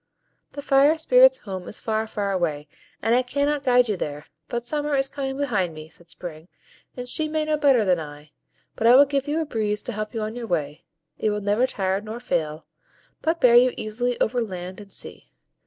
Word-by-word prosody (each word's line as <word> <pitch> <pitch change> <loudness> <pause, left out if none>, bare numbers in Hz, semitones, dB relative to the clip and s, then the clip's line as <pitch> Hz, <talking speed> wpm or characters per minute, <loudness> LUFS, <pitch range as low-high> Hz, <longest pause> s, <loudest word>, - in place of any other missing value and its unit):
"The 285 - -7
Fire 285 +3 +4
Spirits' - - +5
home 190 -3 -7
is - - -5
far, 220 0 -1
far 205 -2 -2
away, 155 -6 -1 0.4
and 225 +2 +2
I 250 - +4
cannot 285 +3 -1
guide 250 -1 +4
you 210 - 0
there; 150 -4 -5 0.2
but 240 0 -4
Summer 295 +2 -1
is 270 0 +2
coming 270 -1 -4
behind 205 - -1
me," 155 0 -10
said 170 +1 -16
Spring, 165 -1 -9 0.5
"and 250 0 -5
she 310 +5 -1
may 310 0 -1
know 310 0 +1
better 275 -7 +3
than 180 -3 +2
I. 150 -1 -10 0.4
But 225 - +1
I 240 - +8
will 280 +2 +8
give 280 0 -2
you 300 +2 0
a - - -2
breeze 215 -6 -2
to - - -5
help 215 +1 -5
you 220 - -1
on 215 +2 -4
your 240 -1 -5
way; 155 -3 -3 0.3
it 215 - +1
will 210 0 -1
never 205 +5 +2
tire 190 -3 -1
nor 220 +2 -7
fail, 155 -9 -2 0.6
but 325 +1 0
bear 245 -5 +5
you 245 +1 +6
easily 240 +3 -2
over 245 +2 +1
land 185 -2 -6
and 200 -1 -14
sea. - - -8
225 Hz, 215 wpm, -24 LUFS, 185-275 Hz, 0.6 s, I